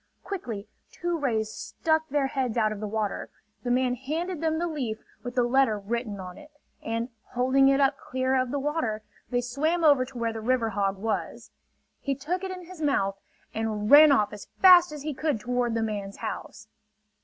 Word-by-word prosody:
Quickly 235 - -5 0.2
two 345 0 -2
rays 220 -6 0
stuck 315 +4 -1
their 285 0 +1
heads 260 -4 -2
out 215 -2 +2
of 215 - -5
the 215 - -3
water. 210 -1 -2 0.3
The 245 - -4
man 250 0 +2
handed 315 +7 -3
them 320 -1 +1
the 345 - 0
leaf 265 -10 -3 0.2
with 245 -1 -6
the 250 - +3
letter 240 -2 +3
written 210 0 -3
on 180 0 -8
it; 300 - -14 0.3
and 230 +2 -2 0.2
holding 260 +2 +4
it 275 0 +4
up 275 0 +2
clear 260 +1 -1
of 255 -1 +1
the 285 - -2
water, 270 -7 -2 0.3
they 245 0 +1
swam 305 +8 0
over 285 -4 +6
to 260 -1 -11
where 230 -1 -1
the 225 - -5
river 240 0 +1
hog 195 -1 0
was. 220 +3 -3 0.5
He 275 -1 -2
took 340 +8 -3
it 380 - -3
in 365 -1 -7
his 355 -2 -11
mouth 195 -10 +1 0.3
and 215 -1 -2
ran 300 +1 +10
off 210 -6 +3
as 210 - -9
fast 360 -3 +8
as 300 -2 -7
he 305 0 -3
could 290 -3 -1
toward 245 0 -1
the 225 - 0
man's 205 -2 -4
house. - - -6
255 Hz, 200 wpm, -27 LUFS, 220-295 Hz, 0.5 s, ran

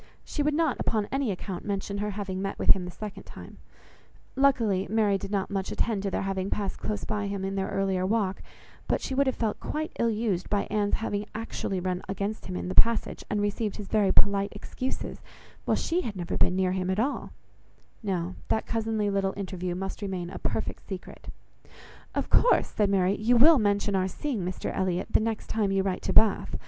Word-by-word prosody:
She 295 - -2
would 295 0 +2
not, 320 -4 +1
upon 215 -2 0
any 270 -3 0
account, 190 -1 -4
mention 200 0 -2
her 210 +1 -1
having 195 -2 -3
met 195 0 -3
with - - +5
him 185 -2 +3
the - - -5
second 210 +2 -7
time; - - -12 0.8
luckily 230 -8 +3
Mary 210 -2 +3
did 195 - -4
not 200 -1 -1
much 195 -1 -2
attend 215 -4 0
to 200 - -1
their - - -1
having 195 0 -1
passed 200 -2 -2
close 210 - -3
by 205 -1 -2
him 200 -1 -3
in 195 - -2
their 195 0 -1
earlier 195 -2 0
walk, 195 -1 0 0.5
but - - +2
she - - -4
would 275 +1 +3
have 260 - +1
felt 220 -3 -1
quite 310 +1 -3
ill 235 - +3
used 210 -5 -1
by 205 -1 +2
Anne's 205 -1 +2
having 210 -2 -2
actually 215 -3 -3
run 180 0 -2
against 200 +2 -3
him 185 - -4
in - - -3
the 185 - -2
passage, 230 +2 +3
and 210 0 0
received 205 +1 -1
his 205 -2 -7
very 205 -3 +3
polite 200 0 +3
excuses, 255 +5 -5 0.4
while - - +2
she 345 +2 0
had 220 - -4
never 175 -2 -3
been 180 - +3
near 185 -1 +2
him 185 0 -1
at 190 +2 +1
all; 270 +6 -1 0.7
no, 185 -4 -2
that 220 - 0
cousinly 220 -2 0
little 195 -1 0
interview 185 -2 -3
must 195 +3 -4
remain 185 -3 -3
a - - -6
perfect - - -2
secret. - - -7 0.9
"Of - - 0
course," - - +4
said 210 -3 +1
Mary, 195 0 +3
"you 235 +3 +3
will 300 +4 +8
mention 205 -1 +1
our 185 0 +2
seeing 235 - -3
Mr 180 +1 -3
Elliot, 185 -1 0
the - - +5
next 220 0 -2
time 210 -3 0
you 195 0 +2
write 190 -1 -1
to - - -2
Bath. 220 -2 +4
200 Hz, 210 wpm, -28 LUFS, 190-220 Hz, 0.9 s, will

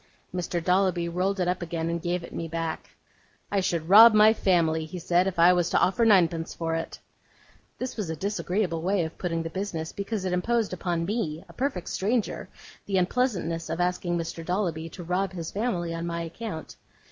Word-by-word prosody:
Mr. 175 -1 -2
Dolloby 180 -1 +2
rolled 185 +3 -1
it 180 - +1
up 180 0 -1
again, 165 -1 -3
and 170 0 -2
gave 175 0 -1
it - - -10
me 165 - -4
back. 165 0 -4 0.6
'I 200 - +2
should 170 -4 -1
rob 215 +4 +9
my 215 +1 +7
family,' 165 -6 +2
he 175 +4 -7
said, 175 +2 +2
'if 190 - -3
I 170 +2 +7
was 175 -1 +1
to - - +3
offer 195 +6 +2
ninepence 170 -6 +3
for 165 -1 -2
it.' 165 0 -3 0.8
This 255 -1 -5
was 205 -6 -3
a 160 - -2
disagreeable 185 -1 -1
way 185 0 +1
of 160 - -9
putting 165 -2 -2
the 165 - -5
business; 175 -4 -4
because 200 0 -4
it 185 - -1
imposed 220 +3 0
upon 170 -2 -2
me, 175 -6 -3
a - - -14
perfect 250 -10 -2
stranger, 215 +3 -1 0.4
the 195 -2 +1
unpleasantness 180 -5 0
of 165 +2 -3
asking 175 -1 0
Mr. 165 0 -4
Dolloby 170 -3 -2
to 175 - -9
rob 185 +2 -1
his 170 -3 -5
family 185 -6 -1
on 165 +1 -4
my 170 0 -3
account. 165 0 -7
180 Hz, 195 wpm, -27 LUFS, 165-195 Hz, 0.8 s, rob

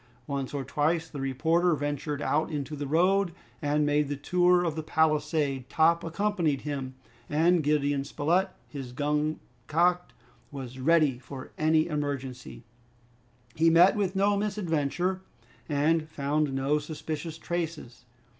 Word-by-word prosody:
Once 140 -2 -3
or 140 -2 -3
twice 160 +5 0
the 145 -4 -7
reporter 160 +6 +2
ventured 145 0 -3
out 155 +2 +1
into 150 -1 -4
the 145 -1 -4
road 180 +4 +2 0.3
and 145 +1 +1
made 145 0 +2
the 145 - -2
tour 180 +4 +3
of 165 -3 -1
the 160 - -2
palisade. 155 -4 0
Top 165 +1 +3
accompanied 170 -5 0
him, 135 -3 -4 0.3
and 165 +3 +3
Gideon 145 -2 +1
Spilett, 165 +7 +1 0.2
his 135 -4 -7
gun 150 +2 0 0.3
cocked, 175 +3 +2 0.4
was 130 -2 -7
ready 150 -3 +3
for 130 0 -9
any 155 0 +3
emergency. 135 -6 -4 0.9
He 165 +1 +4
met 170 +5 +6
with 195 -2 -1
no 200 +1 +3
misadventure 185 -3 -1 0.5
and 155 +2 +1
found 150 0 0
no 135 +3 +1
suspicious 155 +1 -5
traces. 160 -9 -5
150 Hz, 135 wpm, -28 LUFS, 140-170 Hz, 0.9 s, met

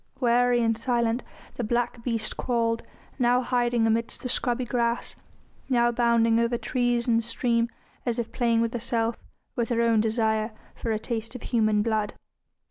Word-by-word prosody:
Wary 245 -1 +3
and 225 0 +2
silent 235 0 0 0.4
the 245 - -2
black 240 +1 -1
beast 230 -3 -1
crawled, 230 -2 0 0.4
now 245 0 +3
hiding 240 -2 +1
amidst 225 +1 -1
the 250 - -3
scrubby 245 0 +1
grass, 235 -1 -1 0.5
now 240 -2 +3
bounding 230 -1 +3
over 235 +1 +1
trees 245 -1 0
and 230 -1 +3
stream 235 0 0 0.3
as 240 -1 0
if 235 -2 -3
playing 230 -2 +2
with 230 0 -1
herself, 230 -1 -1 0.4
with 235 -2 -1
her 235 -1 +1
own 230 -2 +3
desire 220 0 0 0.2
for 230 - -5
a 220 - +1
taste 225 +1 -4
of 250 - -7
human 215 -3 +2
blood. 215 -2 0
235 Hz, 160 wpm, -26 LUFS, 225-240 Hz, 0.5 s, Wary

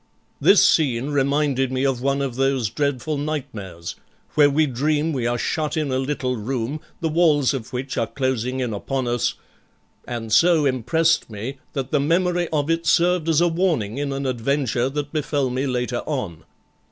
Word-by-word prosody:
This 200 - +6
scene 135 -3 +2
reminded 140 -2 +1
me 130 +1 0
of 130 -3 0
one 140 +1 0
of 135 -3 -2
those 135 -4 +1
dreadful 145 +2 -1
nightmares, 105 - -5 0.4
where 145 -1 +5
we 155 +2 +3
dream 150 +4 0
we 125 -4 -1
are 120 0 0
shut 155 +5 -2
in 150 -3 -1
a 130 - +1
little 130 -2 -1
room, 125 +5 -3 0.2
the 165 - +1
walls 155 -4 +3
of 125 -5 -5
which 130 +2 -3
are 115 - 0
closing 130 0 -2
in 120 -3 -2
upon 130 +5 -2
us, 120 -1 0 0.7
and 115 -2 -4
so 165 +3 +5
impressed 140 +6 +1
me 115 +6 -6
that 135 -2 -3
the 150 - +3
memory 175 +4 +1
of 150 -2 0
it 165 0 -1
served 170 +1 +3
as 160 0 +3
a 175 - +4
warning 160 - 0
in 145 -1 -2
an 135 0 -3
adventure 130 0 0
that 145 +1 -4
befell 145 -3 0
me 130 +3 -1
later 125 -1 -1
on. 110 - -4
135 Hz, 175 wpm, -22 LUFS, 125-150 Hz, 0.7 s, This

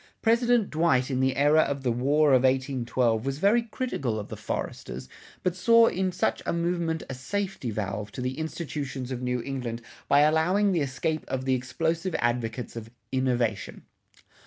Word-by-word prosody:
President 235 -1 +3
Dwight 155 -5 +2
in 130 - 0
the 130 0 +2
era 145 +2 +4
of 140 -3 0
the 125 - +1
War 145 +6 +3
of 130 -2 +5
1812 130 -3 +1
was 135 +1 -2
very 205 +8 +4
critical 215 - -3
of 105 - -7
the - - -5
"foresters," 65 +1 -5 0.4
but 180 -1 0
saw 230 +4 +6
in 190 -3 0
such 180 - 0
a - - -1
movement 170 -1 -1
a - - -5
safety 190 +1 -3
valve 105 -1 -4
to 125 - -5
the 130 +3 -3
institutions 145 -5 -4
of 125 -1 -4
New 125 -1 -1
England 125 -4 -4 0.3
by 145 - +5
allowing 170 +7 +3
the 170 -4 +1
escape 150 +3 -2
of 130 0 -3
the 130 - +2
explosive 165 +8 -1
advocates 120 0 -2
of 115 -1 -7 0.2
"Innovation." 125 -5 -1
135 Hz, 170 wpm, -27 LUFS, 125-170 Hz, 0.4 s, saw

